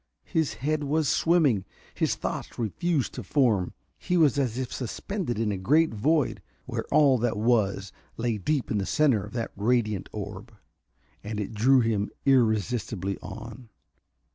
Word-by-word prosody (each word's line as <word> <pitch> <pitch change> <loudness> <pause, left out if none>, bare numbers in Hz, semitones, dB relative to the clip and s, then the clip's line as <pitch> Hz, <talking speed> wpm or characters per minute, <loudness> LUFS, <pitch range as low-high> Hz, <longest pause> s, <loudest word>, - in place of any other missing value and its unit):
His 160 -9 0
head 150 +6 -1
was 150 +1 +1
swimming, 150 - +3 0.3
his - - 0
thoughts - - -5
refused 140 - -1
to - - -5
form. 115 -11 +1 0.3
He 180 - 0
was 145 -5 +4
as 125 -4 -1
if 130 -1 -3
suspended 135 - -3
in 110 -1 0
a 95 - -3
great 150 +11 +3
void, 145 +6 +1 0.2
where - - -4
all 140 -4 +5
that 120 -3 0
was 105 -4 +1 0.3
lay 115 -2 -1
deep 140 +7 -1
in 105 - +1
the 95 - -2
center 135 -10 +3
of 105 - -10
that 115 -2 -3
radiant 105 -2 0
orb. 105 +2 -7 0.7
And 105 0 -4
it 105 +2 -4
drew 125 +5 +4
him 110 -3 0 0.2
irresistibly 110 - +1
on. 125 -3 -9
120 Hz, 155 wpm, -27 LUFS, 105-145 Hz, 0.7 s, all